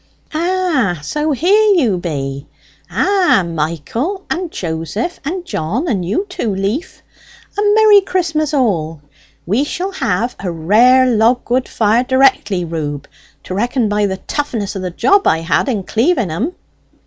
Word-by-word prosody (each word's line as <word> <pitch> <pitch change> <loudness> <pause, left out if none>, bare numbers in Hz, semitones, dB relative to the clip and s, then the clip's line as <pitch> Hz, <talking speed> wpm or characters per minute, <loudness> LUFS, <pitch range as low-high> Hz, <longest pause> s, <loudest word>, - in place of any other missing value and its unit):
"Ah, 320 - 0
so's 300 - -1
here 410 - +4
you 245 - +2
be! 140 -5 -4 0.4
Ah, 375 - +2
Michael 170 - -3
and 355 +1 -2
Joseph 165 - -4
and 350 +5 -4
John 240 - -2
and 200 - -1
you 205 - -1
too, 215 - -3
Leaf! 210 - -3 0.5
a 410 - -1
merry 430 -2 +6
Christmas 330 -5 -1
all! 175 - 0 0.5
We 215 +10 +1
shall 360 +6 -3
have 235 - -1
a 190 - -3
rare 220 +11 +4
log 240 +1 +2
wood 255 +1 +1
fire 225 +2 +2
directly, 260 -8 +2
Reub, 150 -4 -4 0.4
to - - -6
reckon 235 +3 0
by 205 0 +1
the 190 -1 -3
toughness 230 -6 -3
of 195 - -4
the 185 - -3
job 395 - +2
I 160 - +2
had 165 - 0
in 210 -6 -1
cleaving 230 - +1
'em." 245 - -2
235 Hz, 150 wpm, -16 LUFS, -, 0.5 s, merry